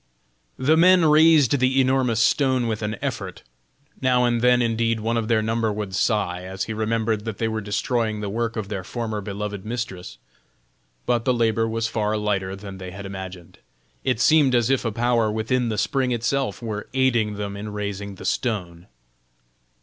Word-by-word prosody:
The 145 +5 +3
men 180 0 +6
raised 155 -3 +5
the 130 +1 +2
enormous 130 -3 +2
stone 130 +1 +2
with 110 -2 -2
an 105 0 -2
effort; 115 -9 -4 0.6
now 125 -1 +3
and 120 -1 +1
then 125 0 +4
indeed 115 -1 +1
one 115 +2 -1
of 115 -2 -1
their 110 -2 +2
number 115 0 0
would 105 -2 -4
sigh, 95 -3 0
as 95 +1 -4
he 110 - -4
remembered 110 0 -1
that 110 -3 -4
they 115 - 0
were 110 0 -2
destroying 110 +1 -1
the 105 - -4
work 115 +3 -2
of 110 -3 -3
their 100 -2 -4
former 110 0 -4
beloved 105 0 -5
mistress. 110 -5 -5 0.9
But 120 -1 +1
the 125 0 +2
labor 115 -1 +1
was 115 0 -1
far 110 -1 -1
lighter 100 -2 -1
than 100 -1 -9
they 95 -1 -7
had 100 +2 -8
imagined. 95 -3 -8 0.4
It 130 -4 0
seemed 145 -2 +4
as 120 +1 +2
if 135 -2 +1
a 115 - 0
power 115 -1 +1
within 115 +3 0
the 110 - -2
spring 125 +6 0
itself 120 -3 -1
were 105 -2 -4
aiding 120 -5 +2
them 100 -1 -4
in 105 +1 -6
raising 100 -1 -5
the 95 - -10
stone. 90 -7 -2
110 Hz, 180 wpm, -23 LUFS, 105-120 Hz, 0.9 s, men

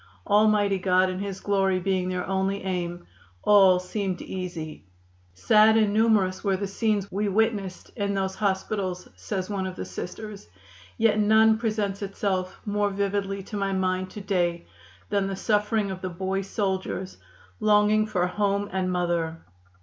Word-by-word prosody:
Almighty 205 -1 +3
God 185 0 +3
and 185 +1 -4
His 195 -1 -4
glory 195 -2 +1
being 185 0 0
their 180 0 -2
only 195 +1 -1
aim, 175 -2 -3 0.4
all 195 -3 +6
seemed 185 0 -3
easy. 175 - -6 0.5
"Sad 215 - +5
and 215 -2 +3
numerous 210 -4 +2
were 195 -2 +1
the 200 - -3
scenes 200 0 -1
we 205 +2 -1
witnessed 205 -3 -1
in 200 -2 -1
those 190 -1 -1
hospitals," 190 -2 -2
says 95 - -4
one 195 -2 -2
of 185 - -6
the - - -5
Sisters, 210 +2 -7 0.5
"yet 220 -1 +3
none 220 +1 +5
presents 215 -3 -1
itself 190 -2 -2
more 205 -1 0
vividly 195 0 -2
to 205 - -6
my 195 -1 -1
mind 185 0 0
to 210 - -8
day 175 -3 0 0.5
than 200 -1 +1
the 195 - -3
suffering 210 0 0
of 185 -1 -6
the 185 - -3
boy 190 +2 -2
soldiers 190 -1 -3 0.4
longing 215 0 +4
for 180 -4 0
home 200 +2 0
and 185 -1 0
mother. 170 -2 -1
195 Hz, 155 wpm, -26 LUFS, 185-210 Hz, 0.5 s, all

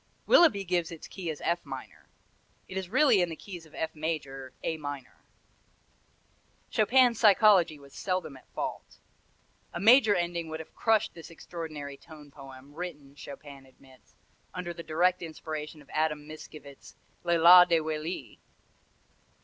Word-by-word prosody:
Willeby 320 - +5
gives 175 -2 -1
its 165 - -9
key 180 -4 -6
as 155 - -5
F 170 +1 -1
minor. - - -10 0.6
It 185 - -9
is 190 -2 -4
really 250 -4 +4
in 175 - 0
the 165 - -6
keys 175 -2 -10
of 155 - -18
F 160 0 -3
major 140 -4 -4
A 160 - -2
minor. 145 -4 -8 1.5
Chopin's 240 +1 +4
psychology 200 -6 +5
was 140 -1 -17
seldom 185 -6 -3
at 130 - -17
fault. - - -5 0.8
A - - -4
major 220 +1 +6
ending 170 -1 -2
would 160 0 -5
have 160 - -11
crushed 220 -1 +1
this 165 -2 -11
extraordinary 155 -4 -8
tone 150 -2 -14
poem, 135 0 -13
written, 150 -5 -8
Chopin 140 -1 -11
admits, 130 -4 -22 0.4
under 175 -1 -4
the 170 - -8
direct 175 +3 +1
inspiration 155 -2 -7
of 140 - -27
Adam 150 -1 -1
Mickiewicz's 155 -2 -12 0.3
"Le 170 -1 +2
Lac 180 +2 +8
de 165 -1 +4
Willis." 155 +2 -5
160 Hz, 150 wpm, -29 LUFS, 145-180 Hz, 1.5 s, Lac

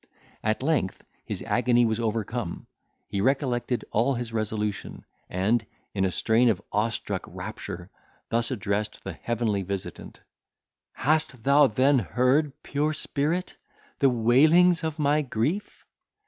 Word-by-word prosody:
At 110 +3 0
length 140 -11 0 0.2
his - - -4
agony 120 0 +3
was 110 0 0
overcome. 115 -3 -3 0.4
He 100 - -2
recollected 125 -1 0
all 125 +5 +2
his 120 -1 -5
resolution, 105 -1 -3 0.2
and, 105 +5 +1 0.3
in 95 -1 +1
a - - +2
strain 115 +6 +3
of 100 -5 +1
awestruck 105 +2 -1
rapture, 85 +2 -7 0.4
thus 115 0 +1
addressed 100 +1 -2
the - - -5
heavenly 115 -4 -1
visitant: 95 0 -6 0.7
"Hast 155 -5 0
thou 140 +2 +6
then 130 +4 +3
heard, 125 - +2
pure 150 +2 0
spirit! 155 +4 -2 0.4
the 135 - +5
wailings 155 +9 +5
of 160 -1 -2
my 150 0 +2
grief? 145 - -2
120 Hz, 125 wpm, -26 LUFS, 110-140 Hz, 0.7 s, thou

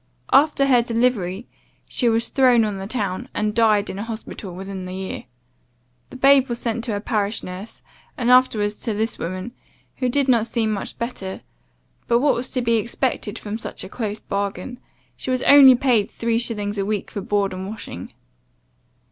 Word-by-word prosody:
After 280 0 +5
her 255 -3 +5
delivery, 230 -4 0 0.4
she 245 - +1
was 230 +1 +1
thrown 250 -4 +4
on 205 -2 -3
the 195 - -5
town; 210 +1 -3
and 210 0 0
died 215 -2 +3
in 190 - -6
an 210 - -4
hospital 220 -3 -7
within 190 0 -6
the 185 0 -6
year. 190 0 -5 0.8
The - - -12
babe 270 0 +5
was 240 - -2
sent 230 -1 -2
to 225 -4 -2
a - - -2
parish 210 0 -2
nurse, 185 +5 -8 0.3
and 245 -2 +1
afterwards 215 -5 +3
to 220 - -3
this 220 +2 -2
woman, 185 +6 -4 0.5
who 255 -2 0
did 275 +2 +1
not 235 -3 +3
seem 225 -3 0
much 205 - -4
better; 195 -5 -5 0.7
but 235 - +4
what 280 +3 +3
was 245 +2 -3
to 255 -2 0
be 230 -1 +3
expected 235 -1 -2
from 215 +1 -5
such - - -7
a - - -8
close 215 -2 -4
bargain? 200 +5 -4 0.4
She - - -6
was 255 -1 0
only 275 -2 +9
paid 240 -5 +2
three 230 0 -1
shillings 210 -3 -2
a - - +1
week 205 0 -3
for 200 - -4
board 200 -1 0
and 185 +1 -5
washing. 205 - -8
225 Hz, 185 wpm, -22 LUFS, 200-245 Hz, 0.8 s, only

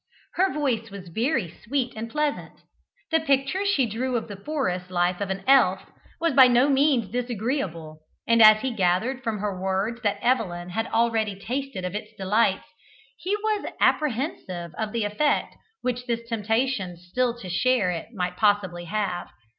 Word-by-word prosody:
Her 380 +1 +2
voice 245 -7 -1
was 195 -3 -9
very 230 - 0 0.2
sweet 250 0 -1
and 225 +1 -5
pleasant; 300 +3 -2 0.5
the 320 - +4
picture 280 +5 +1
she 290 -10 +3
drew 245 +4 -2
of 230 - -2
the 205 - -6
forest 190 -7 -3
life 180 +1 0
of 200 - -2
an 190 0 -3
elf 270 0 +5 0.4
was 335 -2 +1
by 260 -1 +8
no 250 +3 +4
means 270 -5 +3
disagreeable, 220 - -3 0.3
and 230 0 +4
as 215 0 +8
he 265 -2 -2
gathered 215 +7 +1
from 225 -2 -1
her 200 -2 -3
words 195 +5 -1
that 205 -4 0
Evelyn 180 -8 0
had 225 +5 -2
already 225 -3 +1
tasted 250 -3 -4
of 180 - -4
its 215 +1 -6
delights, 195 +1 +1 0.5
he 375 +8 -2
was 425 -1 -2
apprehensive 225 - 0
of 215 +2 -3
the 230 -2 -1
effect 250 +9 0 0.3
which 250 0 -2
this 235 -1 -2
temptation 225 -4 -1
still 235 +8 -1
to 200 - -9
share 205 +1 +2
it 165 -2 -5
might 180 -5 -3
possibly 200 -5 +1
have. 200 -1 -2
225 Hz, 165 wpm, -25 LUFS, 190-260 Hz, 0.5 s, by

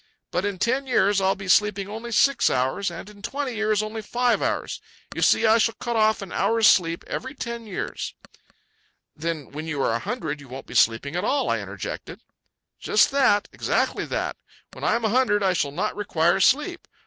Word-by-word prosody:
"But 180 +3 -1
in 200 -2 -2
ten 255 +7 0
years 200 -5 +3
I'll 190 0 +2
be 195 0 -8
sleeping 200 0 +3
only 225 +3 -7
six 275 +4 +3
hours, 130 +10 0
and 170 +2 -8
in 210 -1 -14
twenty 265 +4 -3
years 215 -1 +1
only 215 +1 -5
five 245 +3 +1
hours. - - -2 0.3
You - - -3
see, 230 - +4
I 220 +1 +5
shall 225 0 +2
cut 240 -1 -4
off 220 -2 +2
an 190 - -10
hour's 225 -1 +2
sleep 170 -4 +4
every 260 +3 -5
ten 235 -3 -6
years." 195 - -5 1.0
"Then 160 -2 -4
when 155 +3 -6
you 150 -3 -3
are - - +2
a 115 - 0
hundred 155 - -4
you 140 - -13
won't 130 +2 -8
be - - -11
sleeping 115 +7 +2
at 180 - -1
all," 275 +6 +1
I - - 0
interjected. - - -7 0.6
"Just - - +3
that. 260 -7 +3
Exactly - - 0
that. - - -3 0.4
When - - -10
I - - +2
am 235 -1 -1
a - - +2
hundred 215 -3 +2
I 190 -1 +3
shall 145 -5 0
not 180 +9 -2
require 175 -3 +1
sleep. 300 - +2
210 Hz, 200 wpm, -24 LUFS, 175-235 Hz, 1.0 s, I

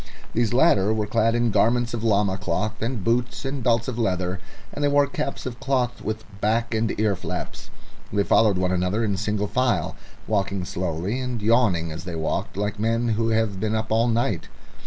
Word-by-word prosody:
These 115 -2 +1
latter 120 - +4
were 110 -1 0
clad 115 +2 +2
in 120 -1 +2
garments 115 +3 +2
of 115 -2 -3
llama 100 -3 +2
cloth 95 +3 -2
and 115 -3 -2
boots 120 +4 0
and 135 0 -3
belts 115 -2 +2
of 125 -2 -3
leather, 90 -4 0 0.3
and 145 - -3
they - - +4
wore 145 0 +4
caps 140 0 -4
of 120 -1 -5
cloth 130 -3 0
with 110 0 -3 0.2
back 115 +2 +1
and 110 -1 0
ear 105 -2 +2
flaps. - - -6 0.4
They 100 0 +2
followed 105 -1 +4
one 90 0 +1
another 90 +5 0
in 100 -3 0
single 105 +1 -1
file, 105 -4 0 0.3
walking 100 -3 -1
slowly 90 +4 -2
and 125 -2 -3
yawning 105 -7 +2
as 80 +3 -6
they 90 -2 -5
walked, 80 +3 -2
like 105 0 -2
men 115 +2 +1
who 115 +1 +1
have 110 -4 +1
been 110 +2 0
up 110 0 -2
all 115 +2 +3
night. 115 -7 0
110 Hz, 195 wpm, -24 LUFS, 100-120 Hz, 0.4 s, latter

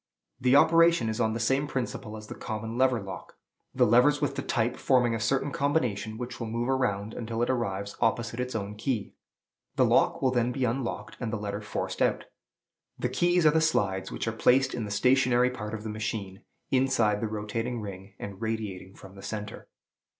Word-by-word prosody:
The 130 +1 +4
operation 165 -4 +5
is 110 +2 -2
on 110 -1 +2
the 115 - -3
same 135 +6 +1
principle 120 -5 -4
as 105 - -9
the - - -7
common 110 +1 -5
lever 130 -1 +3
lock; 100 -2 -8 0.4
the - - +5
levers 125 +6 +5
with 145 - 0
the - - -2
type 120 -1 0
forming 125 -3 +2
a 115 - -1
certain 135 +5 0
combination 125 -7 0
which 120 0 -6
will 115 - -3
move 115 +3 -2
around 110 -5 0
until 115 0 -2
it 120 - +1
arrives 100 -5 -2
opposite 115 +1 0
its 125 -1 -3
own 100 -1 -3
key. 105 0 -3 0.6
The - - +4
lock - - +3
will 130 - +2
then 120 -1 +1
be 130 0 -1
unlocked, 120 +1 -3
and 115 -3 -3
the 110 - -1
letter 105 0 -4
forced 105 - -4
out. - - +1 0.7
The 125 - -1
keys 175 +6 +2
are 155 - +7
the 160 +1 +2
slides, 95 -12 0
which - - -4
are - - +1
placed 130 +4 +3
in 120 -3 -3
the - - -6
stationary 125 +3 +3
part 105 -3 -5
of 105 - -7
the 110 - -4
machine, 105 -3 -4 0.3
inside 130 -6 +2
the 115 - 0
rotating 110 +3 -3
ring, 100 -1 -8
and 100 +1 -8
radiating 105 -4 -4
from 95 - -13
the 100 - -12
centre. 105 0 -6
115 Hz, 200 wpm, -28 LUFS, 105-130 Hz, 0.7 s, are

